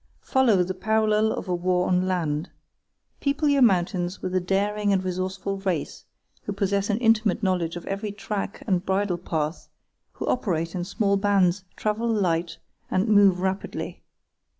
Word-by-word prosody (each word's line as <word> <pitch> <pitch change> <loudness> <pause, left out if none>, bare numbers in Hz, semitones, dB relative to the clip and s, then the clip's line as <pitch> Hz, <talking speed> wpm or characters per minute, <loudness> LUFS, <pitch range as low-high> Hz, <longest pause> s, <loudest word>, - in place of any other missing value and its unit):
Follow 230 -9 +3
the 185 +1 -3
parallel 215 +2 +2
of - - -4
a 180 - 0
war 180 +1 +1
on 180 0 +2
land. 165 -3 -1 0.7
People 285 +2 0
your 285 -1 +3
mountains 180 -4 +2
with 185 - -4
a 185 - +3
daring 205 +3 0
and 190 -1 +2
resourceful 185 +2 -3
race, 185 -6 -3 0.4
who - - -5
possess 200 0 0
an 205 - +2
intimate 225 -3 +2
knowledge 180 -3 0
of 175 - -7
every 200 +2 -3
track 205 0 -5
and 185 -4 +1
bridle 190 -2 0
path, 160 -2 -3 0.4
who - - -5
operate 170 -9 -1
in 180 - -2
small 200 +2 +1
bands, 195 -2 +2
travel 215 +2 -1
light, 175 -6 0 0.3
and 190 +4 +1
move 200 -4 +5
rapidly. 190 +1 -3
195 Hz, 155 wpm, -25 LUFS, 180-210 Hz, 0.7 s, move